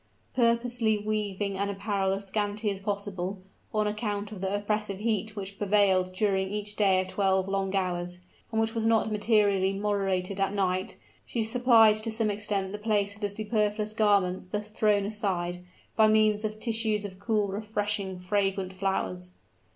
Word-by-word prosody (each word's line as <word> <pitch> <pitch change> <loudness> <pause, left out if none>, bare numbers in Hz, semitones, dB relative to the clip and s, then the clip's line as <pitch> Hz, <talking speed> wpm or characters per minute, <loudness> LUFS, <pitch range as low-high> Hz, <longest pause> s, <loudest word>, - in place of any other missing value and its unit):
Purposely 235 -2 +2
wearing 205 -2 -2
an 200 0 0
apparel 195 -1 -1
as 200 +1 -4
scanty 205 +1 -1
as 195 - -5
possible, 200 -2 -3 0.3
on 215 -1 +1
account 210 -1 -2
of 200 -4 -8
the 195 +1 -1
oppressive 205 -1 -1
heat 215 0 -1
which 200 -1 -7
prevailed 195 -3 +3
during 190 0 0
each 210 0 -3
day 195 -3 +3
of 185 - -1
twelve 190 -1 +1
long 195 0 -1
hours, 180 -1 -1 0.3
and 220 - 0
which 225 0 +1
was 225 - -1
not 225 -1 +2
materially 205 -3 +2
moderated 195 -2 -1
at 195 0 +1
night, 185 -2 -1 0.3
she 230 - -2
supplied 225 -2 +5
to 215 +1 -2
some 220 -1 0
extent 200 -2 -2
the 210 - -5
place 205 -2 0
of 205 - -17
the 205 - 0
superfluous 210 0 -1
garments 200 -4 +2
thus 210 +2 -4
thrown 210 -2 +2
aside, 180 -4 -1 0.3
by 220 -1 +6
means 215 -1 +3
of 215 0 -3
tissues 220 -2 +1
of 190 -2 -8
cool, 210 -1 0
refreshing, 205 -2 -2
fragrant 195 0 -1
flowers. 185 -1 -2
205 Hz, 165 wpm, -28 LUFS, 195-215 Hz, 0.3 s, by